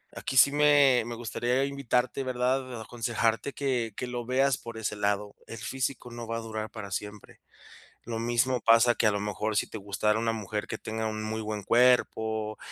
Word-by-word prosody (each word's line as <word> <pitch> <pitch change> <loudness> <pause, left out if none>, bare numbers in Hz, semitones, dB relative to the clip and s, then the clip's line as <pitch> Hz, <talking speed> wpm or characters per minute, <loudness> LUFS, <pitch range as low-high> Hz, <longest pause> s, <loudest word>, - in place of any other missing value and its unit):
Aquí 130 - -4
sí 140 - +8
me 145 -3 +5
me 120 - -5
gustaría 120 +3 -1
invitarte, 135 -1 -1
¿verdad?, 130 -1 -1
aconsejarte 115 +2 -1
que 125 -6 -1
que 125 - -3
lo 120 -1 -5
veas 135 +1 +2
por 115 -1 -9
ese 105 -1 -3
lado, 105 0 -1
el 115 - -8
físico 130 +1 -3
no 120 -1 -7
va 115 0 -2
a - - -2
durar 110 -1 -5
para 100 -3 -8
siempre. 105 +1 -7 0.6
Lo 115 -1 -4
mismo 120 +2 +1
pasa 115 +2 +5
que 115 - +1
a - - +4
lo 100 - -1
mejor 105 +1 -2
si - - +2
te 110 - -7
gustara 105 +2 0
una 115 0 0
mujer 105 -1 -4
que 110 - -4
tenga 110 0 -4
un 110 0 -4
muy 110 +1 -3
buen 105 -1 -4
cuerpo 110 -3 +2
115 Hz, 195 wpm, -28 LUFS, 110-125 Hz, 0.6 s, sí